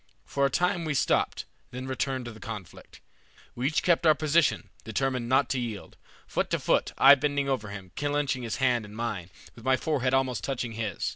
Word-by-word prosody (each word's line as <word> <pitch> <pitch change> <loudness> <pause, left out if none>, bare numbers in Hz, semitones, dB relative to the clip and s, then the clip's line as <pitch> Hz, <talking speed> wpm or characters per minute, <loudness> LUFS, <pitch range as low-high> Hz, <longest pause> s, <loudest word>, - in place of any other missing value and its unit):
For 140 0 +1
a - - -3
time 180 +5 +1
we 155 -2 -1
stopped, - - +1 0.2
then 125 +1 -6
returned 130 -1 -2
to 120 - -6
the 110 - -13
conflict. 105 -6 -9 0.5
We 125 +2 -1
each 150 - 0
kept 170 -2 +3
our 155 - +7
position, 155 0 +2
determined 125 +1 -1
not 135 +2 +4
to 130 - 0
yield, 115 -5 -5 0.3
foot - - -1
to - - +1
foot, - - +1
I 135 +1 +9
bending 145 0 +1
over 130 -6 -1
him, 95 -3 -9
clenching 145 -2 -1
his 115 -2 -3
hand 125 -3 +2
in 105 0 -11
mine, 110 -7 -3 0.2
with 115 - -14
my 130 +1 +3
forehead 135 -3 0
almost 130 -2 0
touching 125 -3 -2
his. 110 -2 -3
130 Hz, 200 wpm, -28 LUFS, 115-140 Hz, 0.5 s, I